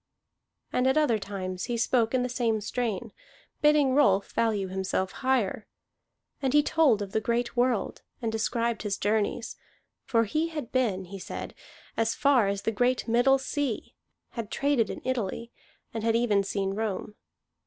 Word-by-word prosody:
And 250 +1 +2
at 265 +3 +3
other 245 -8 +3
times 185 -2 -4
he 240 - -2
spoke 230 0 +2
in 250 - +2
the - - 0
same 235 -3 0
strain, 215 -1 -3 0.5
bidding 295 -3 +4
Rolf 200 -9 +3
value 215 -4 0
himself 190 0 -2
higher. 250 -6 0 0.7
And 265 -1 0
he 295 0 +6
told 275 -11 +3
of 195 - -8
the 220 - 0
great 235 +2 -1
world, 245 -4 0 0.2
and 230 -2 -2
described 230 +1 -1
his 205 -2 -2
journeys. 210 +1 -1 0.5
For 230 -2 +2
he 310 +10 0
had 300 -7 -6
been, 215 -8 0
he 195 +2 -8
said, - - -6 0.4
as 225 0 +1
far 270 -7 +4
as 200 0 -2
the 225 - +1
great 245 +4 +1
Middle 245 +4 +4
Sea, 270 -3 -3 0.4
had 230 -3 -5
traded 275 -6 +1
in - - -6
Italy, 235 -2 -2 0.4
and 225 -1 -4
had 225 0 +2
even 220 -4 +3
seen 195 0 -1
Rome. 210 -1 -3
230 Hz, 165 wpm, -28 LUFS, 205-255 Hz, 0.7 s, he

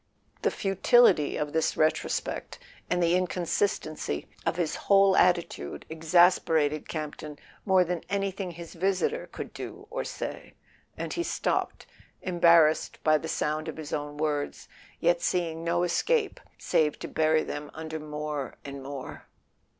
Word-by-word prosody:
The - - +3
futility 195 -4 +3
of 150 -1 -3
this 160 0 +1
retrospect, 155 0 -1 0.3
and 180 0 +1
the 170 0 +3
inconsistency 180 - -1 0.2
of - - +1
his 170 -3 -1
whole 195 -1 +6
attitude, 170 - +1
exasperated 160 -2 +3
Campton 150 -1 -5 0.3
more 190 -1 +5
than 175 -1 -3
anything 195 -1 -2
his 170 -1 -9
visitor 195 - 0
could - - -7
do - - -8
or - - -2
say, - - -6 0.4
and - - -4
he 345 - -1
stopped, - - -1 0.4
embarrassed 170 -3 +4
by 155 -1 +4
the 160 - -6
sound 155 0 -1
of 160 - -5
his 155 -1 -7
own 145 0 -3
words, 150 -1 -2 0.3
yet 170 0 +2
seeing 165 -2 -1
no 170 +1 +1
escape 425 - +1 0.2
save 150 -2 +1
to - - -6
bury 155 0 +2
them 145 0 -5
under 160 0 -5
more 150 -2 -4
and 140 -1 -7
more. 135 -1 -8
160 Hz, 140 wpm, -28 LUFS, 150-180 Hz, 0.4 s, whole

